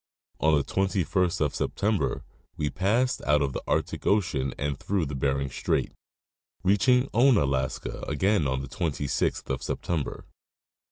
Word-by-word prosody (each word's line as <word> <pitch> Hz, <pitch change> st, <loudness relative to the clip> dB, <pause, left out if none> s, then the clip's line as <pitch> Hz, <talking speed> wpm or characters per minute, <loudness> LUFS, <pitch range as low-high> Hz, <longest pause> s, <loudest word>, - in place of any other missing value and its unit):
On 80 Hz, 0 st, +4 dB
the 70 Hz, -, +1 dB
21st 95 Hz, -1 st, 0 dB
of 75 Hz, -2 st, +1 dB
September 105 Hz, 0 st, -1 dB, 0.3 s
we 75 Hz, -2 st, -1 dB
passed 110 Hz, -, +1 dB
out 75 Hz, -1 st, +3 dB
of 70 Hz, -2 st, -2 dB
the -, -, -3 dB
Arctic -, -, -1 dB
ocean 75 Hz, -10 st, +1 dB
and 70 Hz, -1 st, -2 dB
through 95 Hz, -4 st, 0 dB
Bering 70 Hz, -1 st, -1 dB
Strait, -, -, -1 dB, 0.7 s
reaching 125 Hz, +7 st, +4 dB
Ounalaska 70 Hz, -, +2 dB
again 95 Hz, +2 st, +2 dB
on 65 Hz, 0 st, -1 dB
the 70 Hz, -, -6 dB
26th 75 Hz, -2 st, -1 dB
of -, -, -2 dB
September. 80 Hz, -5 st, -3 dB
80 Hz, 130 wpm, -27 LUFS, 70-100 Hz, 0.7 s, On